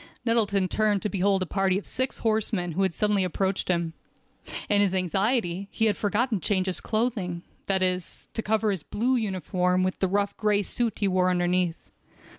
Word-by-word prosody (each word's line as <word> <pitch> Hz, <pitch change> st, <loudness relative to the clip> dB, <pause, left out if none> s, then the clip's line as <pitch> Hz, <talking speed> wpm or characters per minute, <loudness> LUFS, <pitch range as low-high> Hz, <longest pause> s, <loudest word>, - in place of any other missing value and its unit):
Nettleton 205 Hz, -5 st, +2 dB
turned 210 Hz, 0 st, +1 dB
to 210 Hz, -, 0 dB
behold 195 Hz, -1 st, +2 dB
a -, -, -3 dB
party 190 Hz, +1 st, +1 dB
of 200 Hz, -, -5 dB
six 260 Hz, +2 st, -2 dB
horsemen 215 Hz, -5 st, 0 dB
who 175 Hz, +5 st, -1 dB
had 190 Hz, -3 st, +1 dB
suddenly 210 Hz, -2 st, +2 dB
approached 190 Hz, +2 st, -1 dB
him. 170 Hz, -2 st, 0 dB, 0.7 s
In 205 Hz, -1 st, +3 dB
his 195 Hz, -2 st, +2 dB
anxiety 195 Hz, +1 st, 0 dB
he 225 Hz, -, 0 dB
had 215 Hz, -, +2 dB
forgotten 215 Hz, +1 st, 0 dB
to -, -, -3 dB
change 190 Hz, -3 st, +1 dB
his 185 Hz, -2 st, -2 dB
clothing—that 195 Hz, -4 st, -2 dB
is, 180 Hz, -1 st, -2 dB
to 225 Hz, -, -2 dB
cover 220 Hz, 0 st, +1 dB
his 190 Hz, -5 st, -3 dB
blue 245 Hz, -, 0 dB
uniform 185 Hz, -4 st, 0 dB
with 185 Hz, 0 st, -1 dB
the 190 Hz, -, +2 dB
rough 200 Hz, +1 st, 0 dB
gray 210 Hz, -1 st, +2 dB
suit 230 Hz, +2 st, -1 dB
he 200 Hz, -, +1 dB
wore 185 Hz, -1 st, +2 dB
underneath. 175 Hz, -1 st, 0 dB
195 Hz, 185 wpm, -26 LUFS, 185-215 Hz, 0.7 s, In